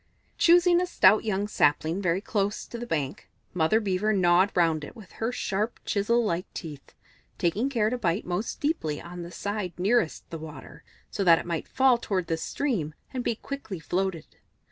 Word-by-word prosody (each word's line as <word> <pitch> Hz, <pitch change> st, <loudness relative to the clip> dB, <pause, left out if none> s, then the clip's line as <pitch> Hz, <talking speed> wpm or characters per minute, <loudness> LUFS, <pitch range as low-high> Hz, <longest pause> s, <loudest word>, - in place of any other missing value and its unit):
Choosing 350 Hz, +1 st, +5 dB
a 360 Hz, -, -1 dB
stout 220 Hz, -10 st, +5 dB
young 205 Hz, -1 st, 0 dB
sapling 160 Hz, 0 st, +1 dB
very 180 Hz, 0 st, +1 dB
close 205 Hz, 0 st, -1 dB
to 235 Hz, -, -8 dB
the 240 Hz, -, -6 dB
bank, 145 Hz, -, -3 dB, 0.2 s
Mother 180 Hz, +5 st, +3 dB
Beaver 205 Hz, 0 st, 0 dB
gnawed 185 Hz, 0 st, +4 dB
round 165 Hz, -3 st, +2 dB
it 150 Hz, -, -9 dB
with 215 Hz, -5 st, -13 dB
her 225 Hz, +2 st, 0 dB
sharp, 215 Hz, -1 st, -2 dB
chisel 230 Hz, +3 st, +1 dB
like 175 Hz, -2 st, -2 dB
teeth, 150 Hz, -5 st, -8 dB, 0.4 s
taking 205 Hz, +10 st, 0 dB
care 225 Hz, -5 st, +1 dB
to 250 Hz, -, -2 dB
bite 180 Hz, -2 st, 0 dB
most 180 Hz, +5 st, -3 dB
deeply 285 Hz, -, -1 dB
on 175 Hz, +1 st, -8 dB
the 170 Hz, -, -7 dB
side 200 Hz, -2 st, -3 dB
nearest 195 Hz, -1 st, +1 dB
the 165 Hz, -, -5 dB
water, 150 Hz, -1 st, -10 dB, 0.3 s
so 200 Hz, -, -1 dB
that 170 Hz, -3 st, +7 dB
it -, -, -5 dB
might 170 Hz, -2 st, -3 dB
fall 260 Hz, -2 st, +3 dB
towards 185 Hz, -7 st, -2 dB
the 165 Hz, -, +1 dB
stream 170 Hz, -, -2 dB, 0.2 s
and 255 Hz, -1 st, -2 dB
be 235 Hz, -, 0 dB
quickly 230 Hz, -7 st, -6 dB
floated. 180 Hz, 0 st, -3 dB
195 Hz, 185 wpm, -27 LUFS, 170-230 Hz, 0.4 s, that